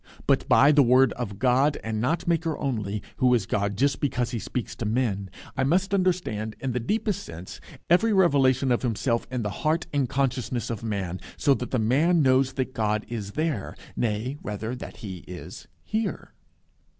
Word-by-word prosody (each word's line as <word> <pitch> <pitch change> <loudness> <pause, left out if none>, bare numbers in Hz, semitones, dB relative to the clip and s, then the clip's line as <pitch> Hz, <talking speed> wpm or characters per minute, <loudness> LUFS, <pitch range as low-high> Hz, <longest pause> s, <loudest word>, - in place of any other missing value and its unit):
But - - +2
by 140 - +7
the 150 -1 +6
word 130 +1 +5
of 120 -4 -4
the 100 - -9
God 130 +6 +3
and 110 -1 -2
not 165 +8 0
Maker 165 -2 +1
only, 105 -7 -2
who 125 -2 +4
is 110 -5 0
God 100 0 -1
just 140 +3 +2
because 125 -4 -1
he 120 - -2
speaks 120 +2 -4
to - - -4
men, 105 -4 0 0.3
I 135 - +1
must 185 +7 +1
understand, 175 - 0
in 135 - -2
the 125 - -1
deepest 210 - -1
sense, 85 +3 -9 0.3
every 200 +7 +4
revelation 135 - +3
of 120 - +2
Himself 115 0 0
in 125 -2 -2
the 105 - -2
heart 160 +3 +1
and 140 -4 +1
consciousness 125 -4 -1
of 115 - -4
man, 95 -5 -3 0.2
so 140 - +4
that 125 -2 -4
the 130 - 0
man 150 +9 +3
knows 130 0 +3
that 130 -1 -2
God 110 -3 0
is 105 -4 -5
there, 155 -10 -2 0.2
nay, 115 +4 -1
rather, 105 +3 -4
that - - -9
he 95 -2 -5
is 90 -1 -9 0.2
here. 220 +1 -3
125 Hz, 185 wpm, -26 LUFS, 110-145 Hz, 0.3 s, by